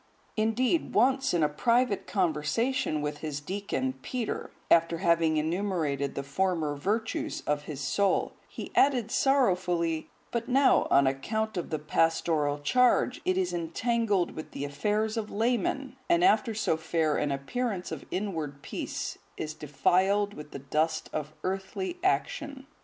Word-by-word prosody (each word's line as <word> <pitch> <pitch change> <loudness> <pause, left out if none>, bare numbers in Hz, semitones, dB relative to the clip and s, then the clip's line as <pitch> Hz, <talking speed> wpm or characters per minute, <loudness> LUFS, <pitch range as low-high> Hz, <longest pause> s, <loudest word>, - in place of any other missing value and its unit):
Indeed, 235 +8 +1
once 265 +4 +3
in 170 -3 +2
a - - +5
private 235 +8 +1
conversation 170 - 0
with 150 0 -3
his 150 -2 -4
deacon, 200 - -2
Peter, 245 -4 -3 0.2
after 165 0 +4
having 165 -1 +2
enumerated 155 -4 -1
the 140 - -3
former 155 0 0
virtues 225 - -2
of 145 0 -1
his 145 -3 -6
soul, 200 +7 +1
he - - -8
added 250 -5 +3
sorrowfully, 180 - +2 0.2
"But 235 0 -2
now, 270 +1 +4
on 140 0 +5
account 220 +12 -1
of 175 - -3
the 155 - -1
pastoral 155 -1 +1
charge, 250 +11 +2
it 185 0 +2
is 180 -2 0
entangled 200 +3 0
with 155 - -8
the 140 - -3
affairs 210 +10 -1
of 215 -2 -2
laymen, 245 +4 -1
and, 345 0 +4
after 260 - +3
so 205 -7 +1
fair 160 -1 0
an 145 -1 0
appearance 190 - -3
of 160 -3 -5
inward 160 -8 -3
peace, - - -4 0.2
is 155 0 -4
defiled 185 +8 +1
with 150 -4 -9
the - - -7
dust 155 +4 -1
of 150 -1 -3
earthly 195 - -3
action. 290 -7 -1
180 Hz, 145 wpm, -29 LUFS, 155-230 Hz, 0.2 s, a